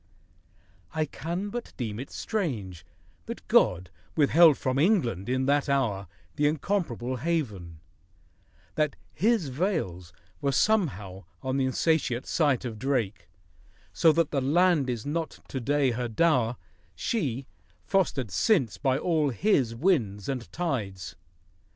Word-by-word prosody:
I 155 Hz, 0 st, +1 dB
can 170 Hz, +7 st, -4 dB
but 240 Hz, +3 st, -6 dB
deem 110 Hz, -4 st, -4 dB
it 135 Hz, -, -6 dB
strange 110 Hz, -, -3 dB, 0.4 s
That -, -, -7 dB
God 90 Hz, 0 st, +3 dB, 0.2 s
withheld 155 Hz, 0 st, +6 dB
from 130 Hz, +1 st, -1 dB
England 125 Hz, -, +2 dB
in 130 Hz, +1 st, +1 dB
that 145 Hz, +1 st, +2 dB
hour 110 Hz, -9 st, 0 dB, 0.3 s
The 145 Hz, -, +3 dB
incomparable 145 Hz, -, -1 dB
haven, 110 Hz, -, -3 dB, 0.9 s
that 150 Hz, -2 st, 0 dB, 0.2 s
His 210 Hz, -, +1 dB
veils 125 Hz, -, -2 dB, 0.3 s
Were 140 Hz, -1 st, +1 dB
somehow 110 Hz, -, 0 dB, 0.2 s
on 130 Hz, 0 st, -1 dB
the 135 Hz, -, +2 dB
insatiate 130 Hz, -2 st, +1 dB
sight 145 Hz, -7 st, +1 dB
of 110 Hz, -3 st, -5 dB
Drake, 115 Hz, -, -1 dB, 0.6 s
So 165 Hz, -, +5 dB
that 165 Hz, -1 st, +1 dB
the 140 Hz, -, 0 dB
land 155 Hz, 0 st, +3 dB
is 120 Hz, -3 st, -3 dB
not 160 Hz, +2 st, -3 dB
to 135 Hz, -, -3 dB
day 140 Hz, +1 st, +2 dB
her 120 Hz, +1 st, -2 dB
dow'r 125 Hz, -2 st, +2 dB, 0.2 s
— -, -, -36 dB
She, 135 Hz, -, -2 dB, 0.4 s
fostered 140 Hz, -, 0 dB
since 135 Hz, -, +2 dB
by 135 Hz, -2 st, +2 dB
all 155 Hz, -2 st, +1 dB
His 130 Hz, -, +1 dB
winds 115 Hz, -, +1 dB
and 130 Hz, -4 st, -4 dB
tides! 95 Hz, -, -3 dB
135 Hz, 130 wpm, -27 LUFS, 115-165 Hz, 0.9 s, withheld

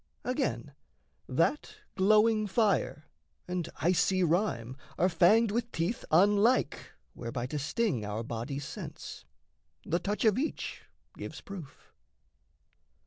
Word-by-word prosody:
Again, 255 Hz, +3 st, -2 dB, 0.6 s
that 300 Hz, +7 st, 0 dB, 0.2 s
glowing 215 Hz, +2 st, +4 dB
fire 190 Hz, -, +1 dB, 0.4 s
and 180 Hz, -2 st, -3 dB
icy 185 Hz, +2 st, +3 dB
rime 160 Hz, -, 0 dB, 0.2 s
Are 180 Hz, -, +3 dB
fanged 200 Hz, +6 st, +4 dB
with 235 Hz, +2 st, -2 dB
teeth 170 Hz, +8 st, -2 dB
unlike 205 Hz, +6 st, +3 dB, 0.2 s
whereby 120 Hz, 0 st, -4 dB
to 150 Hz, +4 st, -3 dB
sting 150 Hz, -, 0 dB
Our 105 Hz, +2 st, -3 dB
body's 120 Hz, +5 st, -4 dB
sense, -, -, -8 dB, 0.6 s
the 170 Hz, -, 0 dB
touch 205 Hz, +4 st, -2 dB
of 215 Hz, +1 st, +4 dB
each 310 Hz, -, -4 dB, 0.3 s
gives -, -, -7 dB
proof. 170 Hz, -9 st, -11 dB
185 Hz, 110 wpm, -30 LUFS, 145-215 Hz, 0.6 s, glowing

